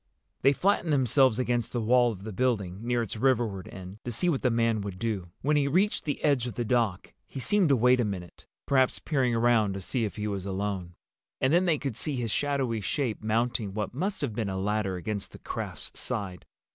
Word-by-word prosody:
They 135 - +6
flattened 175 +2 +1
themselves 130 -3 +4
against 120 -2 -1
the 120 - 0
wall 120 +2 +4
of 100 -3 -9
the 110 - -5
building, 100 -6 0
near 120 0 0
its 110 - -5
riverward 115 -6 +1
end, 95 +2 -9
to 120 - -4
see 175 - +1
what 145 -6 0
the 125 - +3
man 115 -2 +1
would 100 -2 -5
do. 100 -5 -3
When 150 +2 +3
he 140 -1 +2
reached 190 +9 +1
the 145 - -3
edge 140 -5 +2
of 120 - -6
the 120 - -2
dock 115 -6 0
he - - -7
seemed 190 +5 +3
to 140 - +5
wait 125 +1 +4
a - - +3
minute, 95 -5 -6 0.2
perhaps 130 -2 +3
peering 130 -6 0
around 115 -3 +3
to 100 - -5
see 120 +6 -1
if 105 - -3
he 105 - -3
was 100 -2 -3
alone. 95 -3 -3 0.4
And 130 +3 +2
then 175 +2 +4
they 165 -4 +3
could 135 -5 -4
see 140 +6 -2
his 120 -3 -2
shadowy 135 -6 0
shape 120 +2 -2
mounting 110 -2 0
what 105 0 -3
must 190 +8 -2
have 135 -7 -2
been 105 -2 -2
a 95 - -3
ladder 100 0 0
against 100 +3 -4
the - - -9
craft's - - -6
side. 95 -4 -4
115 Hz, 220 wpm, -28 LUFS, 100-135 Hz, 0.4 s, They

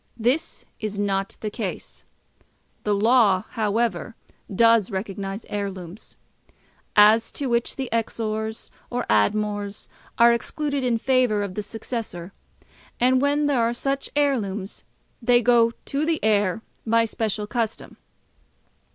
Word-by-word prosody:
This 245 +7 -1
is 210 -1 -4
not 195 -1 -1
the 215 - -3
case. - - -6 0.8
The 210 -1 +2
law, 210 -3 +4
however, 225 +1 -1 0.4
does 230 0 +4
recognise 195 0 -5
heirlooms; 195 -2 -6 0.8
as 215 +2 +6
to 285 - -3
which 235 -1 0
the 265 -2 -3
Exors. 220 -1 -3 0.2
or 245 - -2
Admors. 205 - 0 0.3
are 235 0 +7
excluded 285 +3 -2
in 245 -2 +2
favour 250 -4 +2
of 200 -2 -5
the 210 - -3
Successor; 210 -4 -6 0.7
and 255 +1 +4
when 290 +1 +2
there 280 -4 +2
are 230 +1 +1
such 275 +2 -2
heirlooms 215 -9 -1 0.4
they 240 0 +4
go 235 -1 +4
to 275 +5 -4
the 320 0 0
heir 205 -1 +2 0.2
by 230 0 +3
special 215 -2 -2
custom. 225 0 -3
225 Hz, 125 wpm, -24 LUFS, 205-245 Hz, 0.8 s, are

